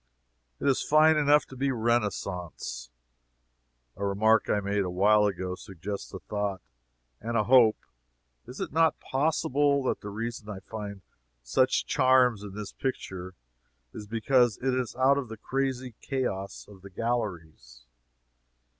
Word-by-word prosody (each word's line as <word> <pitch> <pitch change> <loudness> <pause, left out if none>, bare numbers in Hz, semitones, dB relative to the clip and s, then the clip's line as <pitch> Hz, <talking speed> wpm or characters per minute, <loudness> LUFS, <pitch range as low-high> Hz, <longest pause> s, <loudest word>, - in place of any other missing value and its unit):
It - - -2
is 135 - +3
fine 155 +1 +5
enough 150 0 +4
to 130 - -12
be 135 +2 -1
a 130 - -1
Renaissance. 105 - -2 1.1
A 100 - -6
remark 110 +3 +2
I 105 - +2
made 100 0 -1
a 90 - -3
while 105 +4 +4
ago 95 -2 -3
suggests 95 +2 -7
a 95 - -6
thought 100 +1 -3 0.6
and 115 +1 -2
a 110 - +3
hope. 120 -2 +5 0.7
Is 125 - -9
it - - -4
not 160 0 +3
possible 145 -1 +1
that - - -1
the 105 - -6
reason 115 +1 -5
I 100 -2 -6
find 100 -1 -7 0.4
such 130 - +2
charms 130 -5 +3
in 100 -2 -9
this 105 -1 -6
picture 95 -8 -5 0.6
is 105 - -8
because 115 +1 +2
it 130 0 -1
is 125 -3 -2
out 135 +2 +4
of 130 -5 -6
the 110 - -7
crazy 130 0 -2
chaos 100 -8 -3
of 100 -2 -15
the 100 - -11
galleries? 85 - -4
110 Hz, 150 wpm, -28 LUFS, 100-130 Hz, 1.1 s, fine